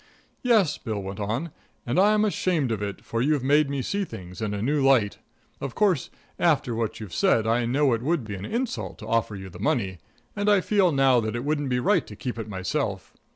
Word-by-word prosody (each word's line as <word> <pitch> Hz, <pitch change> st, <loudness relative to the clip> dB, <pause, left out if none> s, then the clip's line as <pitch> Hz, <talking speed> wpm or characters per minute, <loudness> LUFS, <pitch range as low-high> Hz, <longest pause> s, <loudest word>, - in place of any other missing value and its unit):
"Yes," 220 Hz, -, +3 dB
Bill 110 Hz, -4 st, -4 dB
went 95 Hz, 0 st, -6 dB
on, 115 Hz, +11 st, -2 dB, 0.3 s
"and 120 Hz, +8 st, +1 dB
I'm 210 Hz, +2 st, +4 dB
ashamed 175 Hz, -, 0 dB
of 110 Hz, -2 st, -2 dB
it, 100 Hz, -2 st, -5 dB
for 115 Hz, -, -2 dB
you've 145 Hz, 0 st, +1 dB
made 145 Hz, +2 st, +3 dB
me 140 Hz, -2 st, -2 dB
see 200 Hz, +8 st, -1 dB
things 90 Hz, -, -9 dB
in 105 Hz, -2 st, -1 dB
a -, -, -3 dB
new 145 Hz, +3 st, +1 dB
light. 125 Hz, -7 st, +3 dB, 0.4 s
Of 135 Hz, -, -5 dB
course, 190 Hz, -9 st, +2 dB, 0.3 s
after 145 Hz, -8 st, +2 dB
what 115 Hz, 0 st, -2 dB
you've 105 Hz, -6 st, -8 dB
said, 110 Hz, -, +3 dB
I 115 Hz, +1 st, +1 dB
know 135 Hz, +1 st, +2 dB
it 115 Hz, -, -1 dB
would 155 Hz, +1 st, 0 dB
be 105 Hz, -1 st, -6 dB
an 95 Hz, -1 st, -6 dB
insult 245 Hz, -, -3 dB
to 110 Hz, -, -10 dB
offer 110 Hz, -2 st, 0 dB
you 95 Hz, -1 st, -8 dB
the -, -, -11 dB
money. 110 Hz, -, 0 dB, 0.4 s
And 205 Hz, 0 st, +1 dB
I 205 Hz, -1 st, +5 dB
feel 190 Hz, -2 st, +2 dB
now 135 Hz, -3 st, +4 dB
that 110 Hz, 0 st, -2 dB
it 120 Hz, +3 st, -3 dB
wouldn't 145 Hz, -2 st, 0 dB
be 125 Hz, -1 st, +1 dB
right 185 Hz, +5 st, +2 dB
to -, -, -9 dB
keep 125 Hz, -3 st, -5 dB
it 110 Hz, -1 st, -5 dB
myself. 100 Hz, +1 st, -3 dB
130 Hz, 225 wpm, -25 LUFS, 110-160 Hz, 0.4 s, I